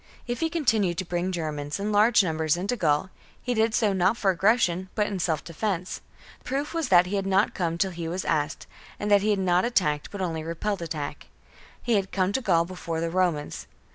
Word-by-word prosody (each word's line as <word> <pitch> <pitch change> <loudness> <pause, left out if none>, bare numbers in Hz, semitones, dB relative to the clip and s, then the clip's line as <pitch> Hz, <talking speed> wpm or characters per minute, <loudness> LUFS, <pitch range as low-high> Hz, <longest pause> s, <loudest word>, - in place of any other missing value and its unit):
If 240 0 -3
he 325 - 0
continued 225 - +1
to 185 - -2
bring 175 +2 -2
Germans 150 -3 -3
in 205 +2 -2
large 215 +1 +5
numbers 160 -2 0
into 200 +7 -1
Gaul, 160 -2 +1 0.3
he 250 - -2
did 225 0 +2
so 210 -4 +2
not 190 +4 +2
for 195 -4 +2
aggression 190 -1 +2
but 210 - +2
in 200 -2 -3
self 160 -3 0
defence; 180 +1 -3 0.4
the - - -29
proof 275 +4 -3
was 330 -4 -1
that 180 -1 +6
he 195 +3 -2
had 195 0 -2
not 195 +2 +2
come 170 -2 -1
till 190 +2 +1
he 170 -1 -5
was 180 +3 -3
asked, 150 0 -1 0.3
and 205 0 -2
that 200 -1 +6
he 215 - 0
had 205 - +3
not 180 -1 +2
attacked 160 -11 0
but 205 - -7
only 165 -4 -2
repelled 175 +4 -3
attack. 155 -3 -5 0.6
He 235 -3 +2
had 195 -1 -2
come 190 -1 +1
to 265 - 0
Gaul 170 -7 +2
before 170 -2 -5
the 165 0 -2
Romans. 175 -5 -1
185 Hz, 220 wpm, -26 LUFS, 170-210 Hz, 0.6 s, that